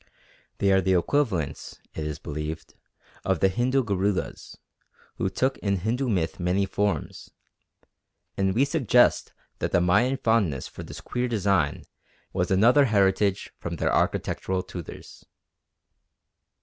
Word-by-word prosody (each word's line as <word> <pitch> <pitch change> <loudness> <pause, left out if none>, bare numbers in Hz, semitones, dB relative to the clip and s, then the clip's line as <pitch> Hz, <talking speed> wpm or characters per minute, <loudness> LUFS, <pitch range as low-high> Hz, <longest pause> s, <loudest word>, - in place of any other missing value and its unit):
They 100 - +2
are 95 0 +4
the 95 +1 +2
equivalents 95 - -1
it 75 -1 -4
is 75 - -4
believed 75 +2 -6 0.5
of 95 -3 0
the 95 - +4
Hindu 130 +7 +1
Garudas, 100 -2 -2 0.6
who 95 - 0
took 130 +8 -1
in 100 -1 0
Hindu 115 +8 -1
myth 85 -7 -1
many 90 +3 +1
forms; 100 +1 -2 1.1
and 95 0 0
we 130 +4 +4
suggest 125 -3 +3 0.3
that - - -2
the - - +3
Mayan 120 +10 +3
fondness 110 - +1
for - - -10
this - - -9
queer 125 0 -2
design 100 -9 +1 0.5
was 90 -2 0
another 120 +9 +5
heritage 100 -3 +1
from 85 -1 -4
their - - 0
architectural 95 -1 0
tutors. 90 -3 -10
95 Hz, 130 wpm, -26 LUFS, 90-115 Hz, 1.1 s, another